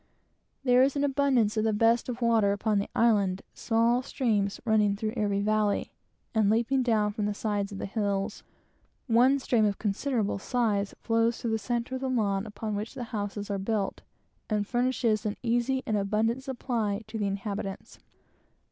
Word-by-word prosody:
There 250 -1 +5
is 270 +2 +3
an 285 - 0
abundance 265 -6 +2
of 215 - +2
the 220 -1 +1
best 230 +3 +2
of 245 0 -4
water 225 -4 +3
upon 210 0 0
the 200 - -3
island, 200 -5 +2
small 235 +2 +2
streams 215 -7 -1
running 210 -3 +3
through 215 +1 -3
every 205 -3 0
valley, 210 0 +1 0.4
and 215 -3 +3
leaping 235 +5 +2
down 215 -4 +1
from 210 -1 -1
the 210 - -2
sides 205 -1 -2
of 200 - -6
the - - -4
hills. 200 0 -2 0.6
One 250 +3 +4
stream 245 -4 +1
of 205 -2 +1
considerable 215 0 -1
size 210 -4 0
flows 230 0 +2
through 230 - -2
the 220 - 0
centre 240 +3 -2
of 260 - -3
the 265 - -1
lawn 210 -4 0
upon 215 +1 -5
which 210 +5 -5
the 250 - -4
houses 205 -1 -3
are 200 - -1
built, 200 0 -2 0.5
and 210 -1 0
furnishes 240 -2 +1
an 210 -2 -3
easy 245 +3 +1
and 215 - 0
abundant 215 +5 0
supply 235 -6 -2
to 220 +1 -6
the 205 - 0
inhabitants. 200 0 -5
220 Hz, 175 wpm, -28 LUFS, 205-240 Hz, 0.6 s, There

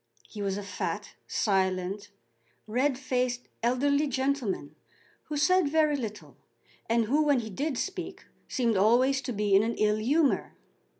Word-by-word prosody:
He 210 - -8
was 195 -1 -1
a 205 - -5
fat, 200 - -4
silent, 190 0 0 0.6
red 255 +5 0
faced, 250 -2 -1 0.2
elderly 280 +5 +2
gentleman, 260 - -1 0.5
who 300 - -4
said 360 +1 +3
very 305 -1 +3
little, 220 -6 -6 0.5
and 230 0 +3
who 285 +8 +2
when 290 -4 +3
he 220 -1 -7
did 280 +6 -2
speak 375 +2 -5 0.2
seemed 235 -5 0
always 250 +7 +4
to 250 - -4
be 210 -2 0
in 195 - +6
an 230 +1 -1
ill 210 0 +2
humour. 280 +6 +1
250 Hz, 145 wpm, -28 LUFS, 210-285 Hz, 0.6 s, in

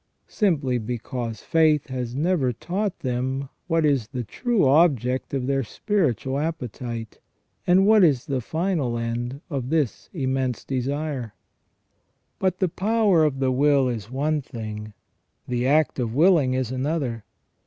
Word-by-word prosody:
simply 145 - +1
because 115 -1 -4
faith 155 -3 +3
has 125 -2 -4
never 150 -3 +1
taught 185 - -3
them 130 +2 -2 0.2
what 165 -2 +2
is 135 -7 +2
the 125 -1 -4
true 225 - 0
object 130 -4 +3
oiF 135 -2 -2
their 135 0 +1
spiritual 140 - -1
appetite, 120 -7 -5 0.5
and 185 +2 +5
what 215 -1 +6
is 140 -8 +3
the 135 -2 -1
final 160 - -1
end 120 +4 -3
of 130 -3 -3
this 155 -6 -1
immense 130 - -2
desire. 135 -3 -3 1.0
But 185 -1 +1
the 185 - +2
power 200 -1 +2
of 150 -3 +1
the 130 -1 +1
will 140 0 +3
is 115 -4 -4
one 145 +4 0
thing, 110 -4 -7 0.5
the 125 0 0
act 150 0 +2
of 120 -2 -2
willing 155 -5 +4
is 130 -2 -1
another. 130 -4 -2
135 Hz, 140 wpm, -24 LUFS, 125-160 Hz, 1.0 s, what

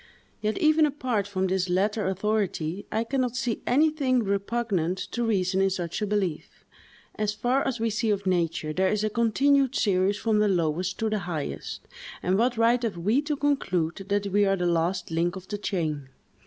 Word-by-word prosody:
Yet, 215 0 -1
even 310 0 +4
apart 255 -8 -2
from 190 -2 -1
this 185 -1 0
latter 205 +3 +1
authority, 195 -3 -1
I 220 +1 0
can 265 +3 -1
not 250 -1 -1
see 240 -2 -2
anything 275 -2 +2
repugnant 200 -3 -1
to 240 - -1
reason 190 -4 +1
in 195 - +3
such 180 0 -3
a 210 - 0
belief. 195 -6 -3 0.5
As 210 -1 -1
far 245 +5 +1
as 250 -3 -2
we 225 0 0
see 220 +1 0
of 200 -1 0
nature, 165 -4 0
there 190 +3 +2
is 215 0 0
a 215 - 0
continued 270 +4 +2
series 195 0 +2
from 220 -1 +1
the 210 - +3
lowest 180 0 0
to 225 - 0
the 215 - 0
highest; 175 -6 -5 0.4
and 185 +2 +2
what 240 +3 +1
right 235 +2 +3
have 220 -7 -2
we 210 +11 +2
to 295 0 -2
conclude 185 - 0
that 205 0 +1
we 200 +1 +2
are 195 -1 +3
the 180 -2 -2
last 175 +2 0
link 170 +2 0
of 190 0 -9
the 205 - -4
chain? 155 -9 -2
205 Hz, 195 wpm, -26 LUFS, 185-235 Hz, 0.5 s, even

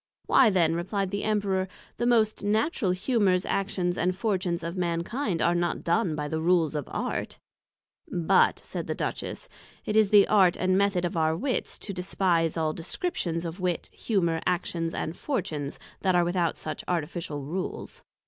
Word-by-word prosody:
Why 255 -4 +6
then, 170 -5 +3
replied 185 +3 -2
the 200 0 -2
Emperor, 200 -3 0 0.3
the 240 - 0 0.3
natural 215 - +1
Humours, 185 -1 +2
Actions 185 -3 -1
and 180 +1 +1
Fortunes 185 -5 -1
of 170 +2 -4
Mankind, 175 - -1
are 170 - +3
not 175 0 -1
done 170 -1 +1
by 150 -1 -3
the 160 +1 -2
Rules 170 -2 +3
of 150 -3 -4
Art: - - -3 0.7
But, 170 -3 +3
said - - -6
the - - -2
Duchess, - - -4 0.4
it 210 - -2
is 215 -2 +5
the 205 -1 +7
Art 190 -4 +4
and 185 0 +2
Method 195 -2 +2
of 175 - -3
our 160 0 +2
Wits 260 +5 -2
to 200 - -6
despise 180 -3 0
all 155 -1 0
Descriptions 170 - -3
of 170 +3 -5
Wit, 180 -2 -2
Humour, 170 -7 0
Actions 170 -2 -1
and 160 - -3
Fortunes 155 - -3 0.2
that 185 -2 +2
are 175 - +5
without 175 -1 0
such 155 - -5
Artificial 160 -3 -3
Rules. 180 +7 -5
180 Hz, 165 wpm, -27 LUFS, 165-195 Hz, 0.7 s, the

